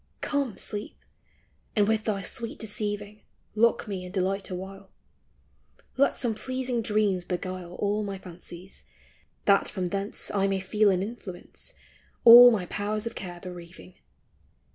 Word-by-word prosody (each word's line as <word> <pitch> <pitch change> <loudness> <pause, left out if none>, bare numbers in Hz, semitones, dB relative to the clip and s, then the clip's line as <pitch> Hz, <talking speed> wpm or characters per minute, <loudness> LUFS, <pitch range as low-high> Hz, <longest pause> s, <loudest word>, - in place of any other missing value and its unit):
Come, 275 -8 -1
Sleep, 205 0 -3 0.8
and 205 -2 +3
with 220 0 +1
thy 200 -3 -1
sweet 230 +4 -4
deceiving 210 -1 -2 0.3
Lock 225 +1 +2
me 195 -3 -4
in 180 - -8
delight 195 +1 -1
awhile; 190 +1 -7 1.1
Let 280 +1 +2
some 240 -3 +1
pleasing 255 +1 -2
dreams 210 -4 +1
beguile 180 -1 -5
All 205 +2 0
my 200 -1 -4
fancies, 180 0 -10 0.6
that 200 -1 +4
from 185 -3 -3
thence 200 +2 -2
I 195 -1 +1
may 195 -1 0
feel 205 +3 +2
an 185 -1 +1
influence, 200 -4 -7 0.5
All 240 +1 +12
my 210 -6 0
powers 210 +3 -3
of 230 - -4
care 175 -2 -7
bereaving 180 0 -10
200 Hz, 140 wpm, -27 LUFS, 185-215 Hz, 1.1 s, All